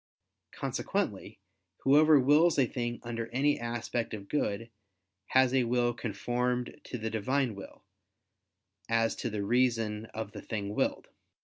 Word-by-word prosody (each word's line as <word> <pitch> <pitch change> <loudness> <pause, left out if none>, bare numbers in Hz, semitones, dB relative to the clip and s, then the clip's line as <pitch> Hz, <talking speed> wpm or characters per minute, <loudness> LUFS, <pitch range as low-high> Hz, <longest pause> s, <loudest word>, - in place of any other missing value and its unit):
Consequently - - -3 0.5
whoever 150 +2 +6
wills 150 +6 +4
a 135 - +5
thing 120 -1 -3
under 115 -1 -4
any 140 +5 +1
aspect 120 -1 -3
of 100 -2 -10
good, 115 -4 -2 0.6
has 130 -1 +4
a 130 -2 +3
will 120 0 +1
conformed 125 +4 -2
to 125 - -5
the 110 -1 -4
Divine 125 +3 0
will, 100 -1 -11 1.1
as 115 -1 +2
to 120 - -2
the 105 -2 -3
reason 115 -2 +1
of 110 -2 -6
the - - -8
thing 100 -2 -4
willed. - - -1
120 Hz, 135 wpm, -30 LUFS, 110-130 Hz, 1.1 s, whoever